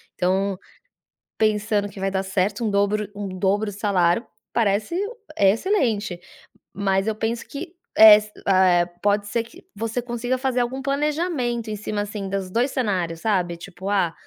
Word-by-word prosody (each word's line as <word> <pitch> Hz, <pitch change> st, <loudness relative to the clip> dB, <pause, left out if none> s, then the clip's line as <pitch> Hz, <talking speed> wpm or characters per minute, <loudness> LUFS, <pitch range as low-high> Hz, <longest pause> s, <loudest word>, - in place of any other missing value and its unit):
Então 190 Hz, +1 st, 0 dB, 0.8 s
pensando 210 Hz, -1 st, +1 dB
que 195 Hz, -, -11 dB
vai 195 Hz, 0 st, -1 dB
dar 190 Hz, 0 st, -1 dB
certo, 195 Hz, +3 st, -1 dB
um -, -, +1 dB
dobro 205 Hz, +1 st, +1 dB
um 205 Hz, -1 st, -4 dB
dobro 205 Hz, +2 st, +1 dB
salário 195 Hz, 0 st, +1 dB, 0.3 s
parece 215 Hz, -, +1 dB, 0.4 s
excelente, 210 Hz, -, +1 dB, 0.5 s
mas 195 Hz, 0 st, 0 dB
eu 220 Hz, -, 0 dB
penso 225 Hz, +2 st, -3 dB
que 330 Hz, +5 st, -7 dB, 0.2 s
es 215 Hz, -1 st, +8 dB
ah 190 Hz, -1 st, +4 dB
é, 175 Hz, -, +1 dB
pode 205 Hz, +4 st, -1 dB
ser 230 Hz, +2 st, -1 dB
que 230 Hz, -, -16 dB
você 230 Hz, +3 st, -3 dB
consiga 245 Hz, +1 st, -2 dB
fazer 255 Hz, -1 st, -1 dB
algum 260 Hz, +3 st, -2 dB
planejamento 275 Hz, -5 st, -1 dB
em 210 Hz, -, -3 dB
cima 210 Hz, 0 st, -3 dB
assim, 205 Hz, -1 st, -4 dB
dos 190 Hz, -1 st, -3 dB
2 245 Hz, +7 st, +1 dB
cenários 180 Hz, -9 st, -1 dB
sabe, 180 Hz, -5 st, 0 dB
tipo, 190 Hz, +2 st, -8 dB
ah, 190 Hz, -5 st, +1 dB
205 Hz, 155 wpm, -23 LUFS, 195-235 Hz, 0.8 s, es